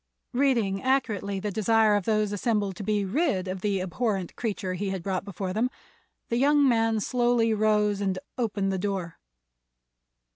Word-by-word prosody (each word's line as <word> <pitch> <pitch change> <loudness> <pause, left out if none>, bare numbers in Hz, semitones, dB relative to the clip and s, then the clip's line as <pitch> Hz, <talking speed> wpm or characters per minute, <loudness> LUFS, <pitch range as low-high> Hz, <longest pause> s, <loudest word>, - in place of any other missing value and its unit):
Reading 235 -7 +1
accurately 220 -7 0
the 210 +2 -3
desire 220 +1 +3
of 205 -3 -1
those 215 -2 +1
assembled 205 -2 0
to - - -5
be 205 0 0
rid 200 - 0
of 185 0 -4
the 200 -1 0
abhorrent 190 0 -2
creature 200 -5 -3
he 195 +2 -3
had 190 -3 -4
brought 190 -1 -2
before 190 -1 -4
them, 230 +5 +1 0.6
the 235 - 0
young 285 +2 +4
man 225 -2 +2
slowly 240 0 +2
rose 210 -1 +2
and 190 -2 0 0.2
opened 205 -5 -1
the 190 - -1
door. 190 -4 -3
210 Hz, 160 wpm, -27 LUFS, 195-230 Hz, 0.6 s, young